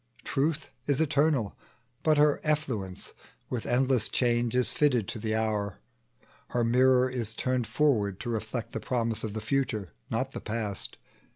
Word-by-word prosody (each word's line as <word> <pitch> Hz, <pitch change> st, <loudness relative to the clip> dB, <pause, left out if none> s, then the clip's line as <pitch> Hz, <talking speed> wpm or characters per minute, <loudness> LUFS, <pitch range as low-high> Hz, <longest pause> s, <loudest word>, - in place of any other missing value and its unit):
Truth 145 Hz, +2 st, -1 dB, 0.2 s
is 140 Hz, -1 st, +2 dB
eternal, 145 Hz, -7 st, +2 dB, 0.5 s
but 155 Hz, -1 st, +3 dB
her 150 Hz, 0 st, +4 dB
effluence, 130 Hz, -12 st, -2 dB, 0.4 s
With 125 Hz, -3 st, -2 dB
endless 125 Hz, -2 st, +2 dB
change 120 Hz, -1 st, +1 dB
is 125 Hz, -1 st, +3 dB
fitted 140 Hz, -, +2 dB
to 115 Hz, -, -5 dB
the 110 Hz, 0 st, -1 dB
hour; 105 Hz, -3 st, -1 dB, 0.7 s
Her 120 Hz, -, 0 dB
mirror 125 Hz, +2 st, +4 dB
is 120 Hz, -4 st, -2 dB
turned 125 Hz, -2 st, 0 dB
forward 105 Hz, -10 st, +2 dB
to -, -, -4 dB
reflect 110 Hz, +1 st, -3 dB
The -, -, -3 dB
promise 115 Hz, -3 st, -1 dB
of 110 Hz, -2 st, -3 dB
the 110 Hz, -, -2 dB
future, 110 Hz, -5 st, -1 dB, 0.2 s
not -, -, -1 dB
the -, -, -6 dB
past. 105 Hz, -3 st, -3 dB
120 Hz, 155 wpm, -29 LUFS, 110-135 Hz, 0.7 s, her